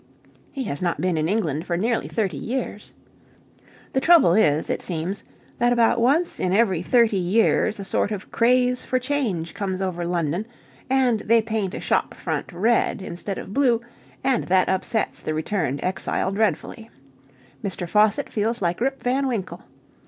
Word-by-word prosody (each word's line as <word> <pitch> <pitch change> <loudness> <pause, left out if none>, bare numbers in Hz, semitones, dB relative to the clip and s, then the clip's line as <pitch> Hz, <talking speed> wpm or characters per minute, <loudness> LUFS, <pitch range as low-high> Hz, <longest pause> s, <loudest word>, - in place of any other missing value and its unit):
(He 270 - -4
has 145 - -4
not 175 -2 -1
been 180 -2 0
in 155 +1 0
England 165 -7 -1
for 170 - 0
nearly 225 +5 0
thirty 195 -8 -1
years!) 230 - -4 1.0
The 265 - +2
trouble 320 - +6
is, 160 -7 +3
it - - -2
seems, 180 +3 -3 0.4
that 240 0 +3
about 235 -1 +3
once 300 +9 +2
in 180 - 0
every 195 -5 +2
thirty 225 0 +3
years 205 +3 +2
a 200 - -5
sort 190 - 0
of 205 -2 -6
craze 250 +1 +2
for 255 - 0
change 250 - -2
comes 190 -2 -3
over 185 -2 -2
London, 170 +3 -1 0.4
and 255 -4 +2
they 230 +2 +3
paint 220 -3 -2
a - - -4
shop - - 0
front - - -4
red 225 +5 +1
instead 190 +1 -5
of 195 - -7
blue, 250 -4 +3 0.4
and 260 -3 +1
that 185 0 +3
upsets 200 +4 -1
the 155 - -3
returned 155 -4 -1
exile 190 +1 -1
dreadfully. 220 +2 -1 0.7
Mr. 185 -3 -3
Faucitt 210 +3 +3
feels 225 +2 -1
like 175 +2 -1
Rip 270 +2 -1
Van 265 +2 +1
Winkle. 220 -8 -4
210 Hz, 165 wpm, -23 LUFS, 180-235 Hz, 1.0 s, trouble